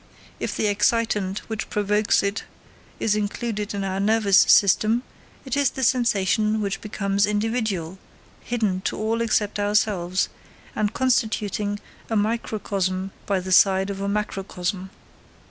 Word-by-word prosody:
If - - -3
the - - 0
excitant 210 -2 0
which 220 -1 -4
provokes 210 +1 +1
it 200 +1 -2 0.6
is 210 -2 +1
included 210 0 -3
in 200 - -2
our 190 0 -2
nervous 205 -1 +4
system, 215 +4 +4 0.4
it 265 - -2
is 285 -2 +3
the 265 - -5
sensation 215 -3 +2
which 200 -2 -2
becomes 200 -1 0
individual, 210 -5 -2 0.4
hidden 215 -6 -1
to - - -1
all 225 +2 -1
except 210 -2 0
ourselves, 205 -3 +1 0.5
and 210 -1 0
constituting 215 -5 0 0.3
a 225 - -1
microcosm 200 -3 -1 0.2
by 195 -2 +1
the 185 +1 -6
side 190 +1 +4
of 195 0 -6
a 200 - -1
macrocosm. 190 -2 -3
205 Hz, 130 wpm, -23 LUFS, 195-220 Hz, 0.6 s, nervous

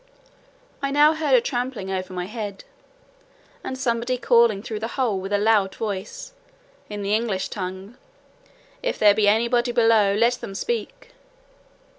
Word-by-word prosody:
I 275 - -1
now 295 +2 +5
heard 305 -4 +2
a 245 - +5
trampling 245 -5 -3
over 185 -1 -4
my 180 -1 -4
head, 205 -1 -6 1.0
and 260 - -5
somebody 245 -1 -1
calling 235 -4 +3
through 220 -3 -5
the 220 - -3
hole 235 -8 0
with 195 +1 -6
a 205 - +3
loud 205 -2 +2
voice, 215 - -5 0.6
in 205 -1 -5
the 200 +1 -1
English 215 -4 -1
tongue, 190 +3 -6 0.8
"If - - -2
there 210 -1 +6
be 210 0 +2
any 220 +3 +3
body 240 0 +1
below, 225 -4 +3
let 235 +3 +2
them 195 - -7
speak." 475 - -4
225 Hz, 155 wpm, -23 LUFS, 200-245 Hz, 1.0 s, there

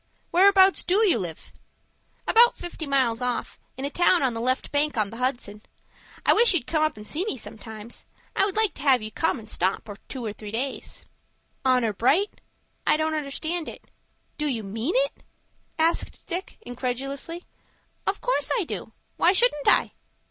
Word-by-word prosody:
Whereabouts 385 +1 +6
do 410 +4 +3
you 330 - +3
live?" 170 -4 -7 0.7
"About 475 +1 +6
fifty 345 -3 -6
miles 255 -4 +2
off, 250 -1 -3 0.2
in 265 - -3
a 285 - -3
town 350 -1 +3
on 255 -3 +2
the 230 - -4
left 255 +2 0
bank 295 -2 +1
of 210 -2 0
the 230 - -8
Hudson. 245 -5 -2 0.6
I - - +7
wish 465 -4 +5
you'd 300 - 0
come 310 -2 0
up 310 -6 +1
and 210 - -9
see 310 +10 -1
me 430 - -3
sometime. 220 0 -8 0.4
I - - +3
would 395 - -3
like 440 -2 +2
to - - -10
have 265 -5 +4
you 215 - -6
come 320 - 0
and 220 -2 -11
stop 190 0 -1 0.2
two 255 -3 -5
or 210 - -3
three 210 0 -9
days." 255 +5 -4 0.6
"Honor 250 -4 +2
bright?" 300 - +1 0.5
"I - - +5
don't 315 0 0
understand." 315 +3 -3 0.7
"Do 300 - 0
you 235 -6 -2
mean 225 - -3
it?" - - 0 0.6
asked 330 +1 0
Dick, 360 +2 -5
incredulously. 275 +7 -4 0.6
"Of - - 0
course - - 0
I 435 - +1
do. - - -6 0.2
Why 360 - +5
shouldn't 375 - +3
I?" - - +5
275 Hz, 175 wpm, -25 LUFS, 230-350 Hz, 0.7 s, I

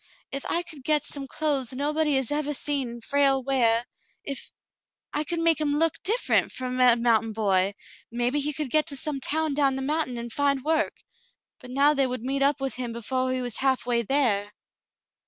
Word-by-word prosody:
If 275 0 -4
I 345 - 0
could 315 -6 -11
get 300 0 +2
some 275 -2 -5
clothes 275 -4 0
nobody 300 +2 0
has 265 -3 +1
evah 295 0 -1
seen 260 -5 -2
Frale 275 +1 +2
weah 240 -3 +2 0.2
— - - -41
if - - -8 0.3
— - - -55
I 300 - 0
could 340 +3 -3
make 330 -2 +2
him 290 -1 +1
look 325 0 0
different 445 +6 +1
from 255 0 -4
a 250 -2 +7
mountain 225 -2 +1
boy, 200 -2 +1 0.4
maybe 245 +4 0
he 290 +1 0
could 295 -3 -4
get 310 0 +2
to 285 - -3
some 285 +1 -3
town 310 +2 0
down 275 -2 +2
the 265 - -3
mountain, 295 -3 -1
and 235 0 -6
find 280 -2 +1
work; 315 0 0 0.6
but 250 - -12
now 280 +3 +4
they 275 -2 +2
would 250 -2 -5
meet 275 +2 -2
up 280 0 +2
with 270 -3 -2
him 245 -1 -4
before 255 +3 -1
he 255 0 -1
was 245 -3 -3
halfway 250 -3 +1
there." 220 -5 +1
270 Hz, 200 wpm, -26 LUFS, 245-295 Hz, 0.6 s, a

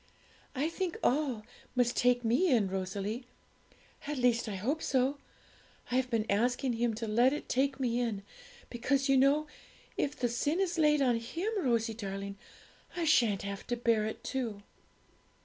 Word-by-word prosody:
I 280 +4 +1
think 345 +1 -3
"all" 255 -6 +1 0.3
must 245 -1 +2
take 245 -1 +2
me 245 +12 +3
in, 225 -6 +3
Rosalie; 195 +6 -3 0.8
at 295 -1 -2
least 240 -2 +2
I 200 - -4
hope 265 +12 -1
so. 265 +2 +1 0.7
I - - +1
have 260 -1 0
been 225 -3 0
asking 245 +5 +1
Him 230 -1 0
to 225 +1 -4
let 240 +5 +4
it 295 - -5
take 270 +1 0
me 245 -2 0
in, 220 -5 -2 0.5
because, 270 +3 0
you 270 - +5
know, 280 +3 +4 0.5
if 285 +1 -1
the 245 - 0
sin 285 +8 0
is 355 -3 0
laid 300 -2 +4
on 245 -3 +3
Him, 330 - -3
Rosie 230 - +1
darling, 200 -2 -6 0.6
I 345 - 0
sha'n't 230 - +3
have 200 0 -6
to 240 - -1
bear 230 -3 +2
it 220 - -6
too.' 225 -6 -3
245 Hz, 165 wpm, -31 LUFS, 220-275 Hz, 0.8 s, you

